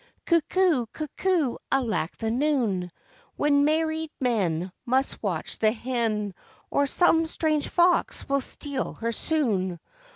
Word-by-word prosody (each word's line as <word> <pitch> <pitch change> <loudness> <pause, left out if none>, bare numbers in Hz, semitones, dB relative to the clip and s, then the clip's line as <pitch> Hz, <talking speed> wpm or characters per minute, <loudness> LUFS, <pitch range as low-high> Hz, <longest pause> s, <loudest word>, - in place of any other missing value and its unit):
Cuckoo! 335 -5 +2
cuckoo! 310 +1 -1
alack 220 -11 0
the 225 -1 -2
noon, 235 - 0 0.4
When 285 -1 +3
married 315 +1 +1
men 185 -8 0
Must 260 +2 0
watch 185 -7 -2
the 215 -1 +4
hen, 225 -4 -2 0.4
Or 285 0 +2
some 325 +1 +3
strange 310 -2 0
fox 350 0 +2
will 275 0 +1
steal 280 +1 -4
her 230 0 -2
soon. 210 - 0
265 Hz, 120 wpm, -26 LUFS, 220-310 Hz, 0.4 s, the